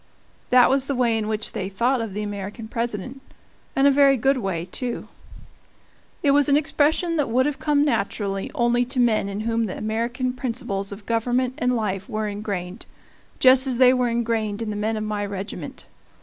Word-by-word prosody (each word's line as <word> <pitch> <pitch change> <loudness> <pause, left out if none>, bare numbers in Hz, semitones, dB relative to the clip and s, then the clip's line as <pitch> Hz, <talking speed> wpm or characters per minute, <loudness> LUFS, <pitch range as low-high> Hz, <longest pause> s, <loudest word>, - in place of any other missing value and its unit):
That 250 -1 +6
was 275 0 +1
the 280 - -1
way 240 -2 +2
in 220 -1 -1
which 215 -1 -3
they 190 - -4
thought 240 +6 +1
of 215 -4 -5
the 210 - -2
American 205 +2 -6
President 235 +2 -4 0.5
and 270 - +3
a 280 - +7
very 275 -1 +5
good 270 +4 +2
way, 190 -7 -2
too. 240 +6 -4 1.2
It 285 - +4
was 285 0 +3
an 280 - +5
expression 315 +3 +1
that 290 -5 0
would 255 +3 +2
have 295 -1 -2
come 295 -1 +2
naturally 200 -5 -1
only 240 0 +2
to 255 +1 -3
men 220 -4 +2
in 200 +1 -4
whom 230 0 0
the 185 - -6
American 235 +4 -2
principles 230 -6 -3
of 200 +1 -9
government 245 +2 0
and 250 0 +1
life 195 -4 -2
were 215 0 -2
ingrained, 200 -1 -5 0.5
just 260 +1 +6
as 255 -2 0
they 255 0 +6
were 250 -1 +1
ingrained 230 -2 -1
in 215 - -3
the - - -4
men 215 +2 -1
of 215 - -3
my 210 -1 -2
regiment. 200 0 -6
230 Hz, 190 wpm, -23 LUFS, 210-255 Hz, 1.2 s, a